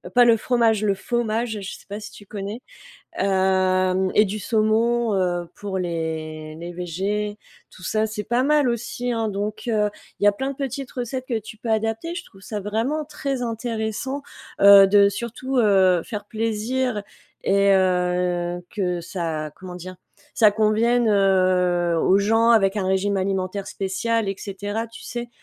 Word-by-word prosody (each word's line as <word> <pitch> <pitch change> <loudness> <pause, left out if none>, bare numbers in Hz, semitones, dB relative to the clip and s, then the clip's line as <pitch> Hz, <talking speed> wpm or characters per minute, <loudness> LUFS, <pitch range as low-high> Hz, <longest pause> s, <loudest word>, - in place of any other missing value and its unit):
Pas 245 0 +7
le 230 -1 +6
fromage, 225 -2 +2
le 200 -2 +2
faumage. 225 +1 -2
Je 195 - -6
sais - - -19
pas 205 +2 -6
si 215 - -9
tu 205 - -14
connais? 205 +2 -6 0.6
Hem 185 -1 +2
et 210 - +7
du 210 +1 -4
saumon, 225 +2 +1
heu, 175 -2 0
pour 200 -2 -4
les 160 -3 -4
les 170 +2 -7
végés. 195 +5 -3 0.3
Tout 180 - -14
ça, 215 +5 +1
c'est 210 -1 -5
pas 240 +4 +1
mal 290 -1 +3
aussi, 240 +1 -2
hein. 225 -1 -1
Donc 210 +3 -4
heu, 210 -2 +2 0.3
il - - -1
y - - +6
a 205 - +6
plein 265 +7 -3
de 275 - -7
petites 275 -1 -4
recettes 255 +1 -4
que 235 -3 0
tu 220 0 -10
peux 230 +1 -5
adapter. 225 +10 -1
Je - - -5
trouve 195 - -18
ça 210 +2 -5
vraiment 225 +10 -1
très 275 -3 -4
intéressant, 230 +3 -3 0.4
heu, 200 -1 +9
de 200 0 +6
surtout, 235 +5 -3
heu, 190 -6 +4
faire 205 +2 -6
plaisir 225 +1 -2 0.4
et 200 0 +3
heu, 180 -1 +1
que 180 -4 -1
ça, 165 -4 -4
comment 185 -1 -9
dire, 185 +1 -8 0.4
ça 215 -3 +6
convienne, 220 +3 +2
heu, 185 -3 +3
aux 185 +4 +4
gens 225 +3 +3
avec 205 -3 +4
un 195 -2 -1
régime 195 +1 +1
alimentaire 190 +1 -2
spécial 205 +3 -1
et 195 - -1
cetera, 205 +3 -4
tu 230 - -12
sais? 240 0 -5
205 Hz, 170 wpm, -23 LUFS, 190-230 Hz, 0.6 s, heu